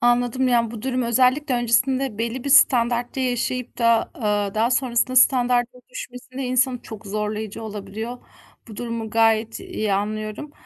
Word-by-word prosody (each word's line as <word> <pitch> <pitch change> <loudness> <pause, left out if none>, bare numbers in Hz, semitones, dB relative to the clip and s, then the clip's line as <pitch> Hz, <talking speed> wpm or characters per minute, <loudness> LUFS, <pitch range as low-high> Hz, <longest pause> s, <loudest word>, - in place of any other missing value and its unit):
Anladım, 245 +2 +2
yani, 235 -2 +2
bu 225 -2 -8
durum 255 -1 -1
özellikle 255 +4 +2
öncesinde 245 0 +1
belli 235 +2 -3
bir 280 - -2
standartta 245 -2 +4
yaşayıp 250 0 -2
da, 230 -1 +3
aaa, 205 -3 -1
daha 225 +2 +2
sonrasında 255 0 +1
standardın 245 -1 +3
düşmesinde 255 +2 -8
insanı 255 0 +1
çok 220 -1 -10
zorlayıcı 210 +1 -4
olabiliyor. 220 +3 -6 0.5
Bu 215 - -10
durumu 230 -2 -4
gayet 225 0 +2
iyi 355 - -3
anlıyorum. 215 +7 -3
240 Hz, 140 wpm, -22 LUFS, 220-255 Hz, 0.5 s, standartta